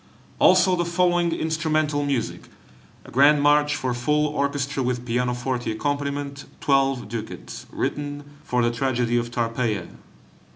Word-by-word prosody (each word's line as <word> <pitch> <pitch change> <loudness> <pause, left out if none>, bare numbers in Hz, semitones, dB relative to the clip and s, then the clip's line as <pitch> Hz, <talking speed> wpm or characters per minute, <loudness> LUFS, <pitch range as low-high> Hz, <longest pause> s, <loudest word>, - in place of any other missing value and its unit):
Also 185 0 +5
the 175 - 0
following 175 0 +2
instrumental 155 -2 0
music: 140 -4 -2 0.6
a - - -12
Grand 145 +3 +5
March 145 0 +3
for 130 -1 -2
full 150 +5 +1
orchestra, 140 -1 -1
with 125 -1 -2
pianoforte 125 0 -1
accompaniment, 140 +2 -3
12 135 -4 +1
ducats, 110 0 -7
written 145 0 -3 0.2
for 125 -1 0
the 120 - +2
tragedy 120 -1 0
of 120 0 -1
"Tarpeia." 115 -5 -1
140 Hz, 125 wpm, -24 LUFS, 120-150 Hz, 0.6 s, Also